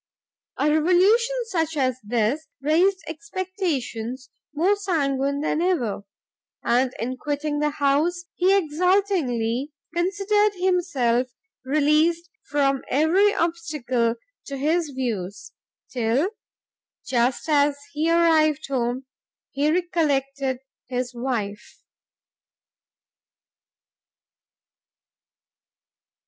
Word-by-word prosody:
A 290 Hz, -, +1 dB
revolution 375 Hz, +10 st, +3 dB
such 320 Hz, -4 st, -1 dB
as 255 Hz, -2 st, +1 dB
this, 235 Hz, +8 st, 0 dB
raised 355 Hz, +7 st, +2 dB
expectations 320 Hz, -, -4 dB, 0.2 s
more 345 Hz, +7 st, +2 dB
sanguine 280 Hz, -8 st, 0 dB
than 310 Hz, +1 st, 0 dB
ever; 250 Hz, -, 0 dB, 0.6 s
and 250 Hz, +2 st, +2 dB
in 255 Hz, +3 st, -3 dB
quitting 295 Hz, +1 st, -2 dB
the 300 Hz, 0 st, +2 dB
house, 300 Hz, +5 st, +1 dB
he 365 Hz, +2 st, +2 dB
exultingly 305 Hz, -, +1 dB, 0.2 s
considered 400 Hz, +4 st, +1 dB
himself 280 Hz, -10 st, +1 dB, 0.4 s
released 305 Hz, +5 st, +2 dB, 0.2 s
from 275 Hz, -2 st, +1 dB
every 340 Hz, +9 st, +3 dB
obstacle 295 Hz, -9 st, 0 dB, 0.3 s
to 275 Hz, -, -5 dB
his 315 Hz, +3 st, +1 dB
views 225 Hz, -8 st, -4 dB, 0.4 s
till, 250 Hz, -, +1 dB, 0.7 s
just 245 Hz, +2 st, 0 dB
as 290 Hz, -2 st, +3 dB, 0.2 s
he 310 Hz, +2 st, 0 dB
arrived 320 Hz, -3 st, +3 dB
home, 255 Hz, 0 st, -1 dB, 0.5 s
he 290 Hz, +2 st, +1 dB
recollected 275 Hz, -6 st, 0 dB, 0.3 s
his 250 Hz, 0 st, -3 dB
wife! 235 Hz, -5 st, -4 dB
295 Hz, 85 wpm, -24 LUFS, 255-345 Hz, 0.7 s, revolution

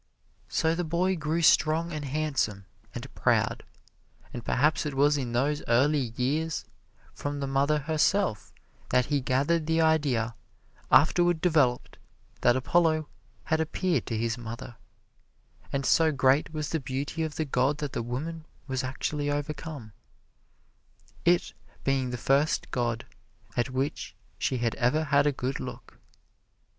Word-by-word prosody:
So 160 Hz, 0 st, +1 dB
the 175 Hz, +1 st, -1 dB
boy 175 Hz, +3 st, +1 dB
grew 160 Hz, +1 st, -1 dB
strong 160 Hz, +2 st, +3 dB
and 150 Hz, -1 st, -4 dB
handsome, 135 Hz, -9 st, -1 dB, 0.3 s
and -, -, -7 dB
proud; -, -, +1 dB, 0.7 s
and 120 Hz, -, -6 dB
perhaps 150 Hz, +7 st, +2 dB
it 150 Hz, -3 st, -4 dB
was 145 Hz, +2 st, +4 dB
in 125 Hz, -4 st, -3 dB
those 145 Hz, +5 st, +1 dB
early 130 Hz, +1 st, +2 dB
years, 150 Hz, +5 st, -1 dB, 0.5 s
from 145 Hz, 0 st, -4 dB
the 140 Hz, -, -2 dB
mother 140 Hz, +2 st, +2 dB
herself, 155 Hz, -, 0 dB, 0.4 s
that 125 Hz, 0 st, +3 dB
he 140 Hz, -, +2 dB
gathered 145 Hz, +6 st, +1 dB
the 160 Hz, 0 st, +2 dB
idea, 145 Hz, -8 st, +2 dB, 0.6 s
afterward 175 Hz, -1 st, +4 dB
developed, 150 Hz, -8 st, +1 dB, 0.4 s
that 120 Hz, -, +4 dB
Apollo 155 Hz, +3 st, +2 dB, 0.3 s
had 160 Hz, -, 0 dB
appeared 170 Hz, +2 st, -1 dB
to 115 Hz, -, -2 dB
his 115 Hz, +2 st, -1 dB
mother, 120 Hz, +1 st, -7 dB, 1.0 s
and 140 Hz, -1 st, -1 dB
so 160 Hz, +3 st, +4 dB
great 135 Hz, +2 st, +2 dB
was 155 Hz, -2 st, -3 dB
the 160 Hz, -, -1 dB
beauty 140 Hz, +4 st, -4 dB
of 160 Hz, -2 st, -2 dB
the 160 Hz, -, -1 dB
god 135 Hz, +1 st, +1 dB
that 145 Hz, -2 st, -4 dB
the 120 Hz, -, -1 dB
woman 155 Hz, +7 st, -5 dB, 0.2 s
was 130 Hz, -2 st, -2 dB
actually 145 Hz, +3 st, -2 dB
overcome, 145 Hz, -5 st, -4 dB, 1.3 s
it 175 Hz, 0 st, +3 dB, 0.3 s
being 135 Hz, -2 st, +1 dB
the 125 Hz, -, -3 dB
first 140 Hz, +6 st, +1 dB
god 120 Hz, -2 st, -1 dB, 0.5 s
at 120 Hz, +2 st, 0 dB
which 135 Hz, +3 st, -3 dB, 0.2 s
she 130 Hz, -, 0 dB
had 115 Hz, -1 st, 0 dB
ever 130 Hz, +5 st, +2 dB
had 145 Hz, -1 st, +3 dB
a -, -, +4 dB
good 130 Hz, 0 st, -3 dB
look. -, -, -9 dB
145 Hz, 145 wpm, -28 LUFS, 130-155 Hz, 1.3 s, was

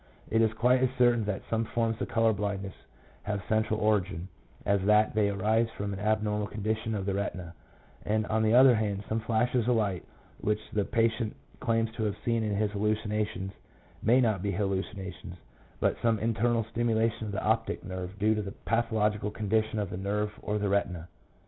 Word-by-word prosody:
It 115 Hz, -, +3 dB
is 110 Hz, -1 st, +3 dB
quite 125 Hz, +3 st, +3 dB
as 130 Hz, -, +3 dB
certain 120 Hz, -3 st, +4 dB
that 105 Hz, -1 st, -3 dB
some 115 Hz, 0 st, 0 dB
forms 115 Hz, 0 st, -1 dB
of -, -, -1 dB
colour 115 Hz, -1 st, +3 dB
blindness 100 Hz, -2 st, -3 dB, 0.5 s
have 105 Hz, -2 st, -3 dB
central 110 Hz, 0 st, +1 dB
origin, 100 Hz, -4 st, 0 dB, 0.4 s
as 100 Hz, -1 st, +2 dB
that 105 Hz, +1 st, +4 dB
they 105 Hz, -1 st, +2 dB
arise 110 Hz, +3 st, +1 dB
from 100 Hz, 0 st, -3 dB
an 95 Hz, -, -5 dB
abnormal 105 Hz, 0 st, 0 dB
condition 110 Hz, +2 st, -2 dB
of 100 Hz, -2 st, -3 dB
the 100 Hz, -, 0 dB
retina; 95 Hz, -4 st, -3 dB, 0.5 s
and, 110 Hz, +1 st, 0 dB
on 110 Hz, +1 st, 0 dB
the 110 Hz, +1 st, +3 dB
other 130 Hz, 0 st, +8 dB
hand, 105 Hz, -3 st, -1 dB
some 110 Hz, -, 0 dB
flashes 115 Hz, +1 st, +1 dB
of 125 Hz, -, +4 dB
light 100 Hz, -5 st, 0 dB, 0.4 s
which 105 Hz, 0 st, 0 dB
the 105 Hz, -2 st, +1 dB
patient 115 Hz, -1 st, 0 dB, 0.2 s
claims 115 Hz, -2 st, +1 dB
to 110 Hz, 0 st, -4 dB
have 105 Hz, -1 st, -2 dB
seen 115 Hz, -1 st, +1 dB
in 105 Hz, -2 st, -1 dB
his 105 Hz, 0 st, 0 dB
hallucinations 105 Hz, -2 st, -1 dB, 0.5 s
may 120 Hz, +4 st, +4 dB
not 110 Hz, -7 st, +2 dB
be 100 Hz, -, -1 dB
hallucinations, 95 Hz, -1 st, -3 dB, 0.4 s
but -, -, 0 dB
some 115 Hz, -1 st, +3 dB
internal 115 Hz, +2 st, +1 dB
stimulation 115 Hz, -1 st, 0 dB
of -, -, -4 dB
the 100 Hz, -, -3 dB
optic 110 Hz, +1 st, 0 dB
nerve 95 Hz, 0 st, -6 dB
due 105 Hz, +2 st, +3 dB
to 105 Hz, -, -1 dB
the 100 Hz, -1 st, -6 dB
pathological 105 Hz, -3 st, +1 dB
condition 110 Hz, +1 st, 0 dB
of 100 Hz, -3 st, -2 dB
the -, -, -4 dB
nerve 105 Hz, +2 st, -1 dB
or 105 Hz, -, -1 dB
the 105 Hz, -1 st, -1 dB
retina. 90 Hz, -4 st, -1 dB
105 Hz, 185 wpm, -29 LUFS, 100-115 Hz, 0.5 s, other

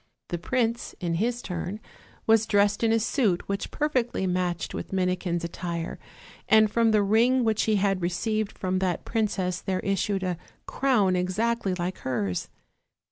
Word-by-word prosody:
The 175 Hz, -, -2 dB
prince 235 Hz, +5 st, -1 dB
in 175 Hz, -3 st, -1 dB
his 235 Hz, +7 st, -1 dB
turn 180 Hz, +3 st, -4 dB, 0.5 s
was 225 Hz, 0 st, +4 dB
dressed 205 Hz, 0 st, +2 dB
in 225 Hz, -, +4 dB
a 225 Hz, -, +4 dB
suit 215 Hz, -, +1 dB
which 200 Hz, 0 st, -2 dB
per 300 Hz, -, 0 dB
fectly 245 Hz, -9 st, 0 dB
matched 180 Hz, -1 st, -1 dB
with -, -, -5 dB
Minikin's 180 Hz, -2 st, 0 dB
attire, 170 Hz, 0 st, -4 dB, 0.5 s
and 215 Hz, -1 st, +6 dB
from 230 Hz, 0 st, +3 dB
the 215 Hz, -2 st, +4 dB
ring 235 Hz, +5 st, +3 dB
Avhich 220 Hz, -1 st, +1 dB
he 220 Hz, -, +2 dB
had 195 Hz, -2 st, +1 dB
received 215 Hz, +5 st, -1 dB
from 185 Hz, 0 st, -1 dB
that 185 Hz, -2 st, -1 dB
princess 195 Hz, -5 st, -1 dB
there 190 Hz, -1 st, -1 dB
issued 195 Hz, 0 st, 0 dB
a 180 Hz, -2 st, -2 dB, 0.3 s
crown 215 Hz, -9 st, +2 dB
exactly 195 Hz, +2 st, 0 dB
like 180 Hz, +1 st, -3 dB
hers. 100 Hz, -8 st, -2 dB
195 Hz, 160 wpm, -26 LUFS, 180-225 Hz, 0.5 s, and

